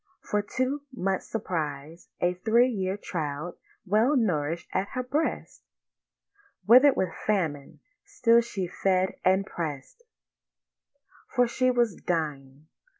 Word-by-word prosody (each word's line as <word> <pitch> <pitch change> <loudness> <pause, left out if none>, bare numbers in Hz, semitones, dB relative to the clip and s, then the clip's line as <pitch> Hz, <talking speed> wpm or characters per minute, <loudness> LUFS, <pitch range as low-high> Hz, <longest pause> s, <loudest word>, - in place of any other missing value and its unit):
For 210 - 0 0.2
to 260 +3 0
much 195 -6 -1
surprise 160 -6 -5
A 175 0 +2
three 225 +7 +3
year 190 -4 -2
child 160 -3 -4 0.3
well 220 +9 +3
nourish'd 170 - 0
at 195 - 0
her 255 - 0
breast, 290 +6 -2 1.0
Wither'd 255 +5 +7
with 185 -3 -1
famine, 160 -9 -1 0.2
still 235 -2 +3
she 205 -5 -4
fed 185 +1 0
and 190 +1 +3
press'd— 155 - -6 1.3
For 245 -1 +2
she 255 +2 +1
was 240 -4 +2
dying. 150 -5 -4
190 Hz, 115 wpm, -27 LUFS, 165-235 Hz, 1.3 s, Wither'd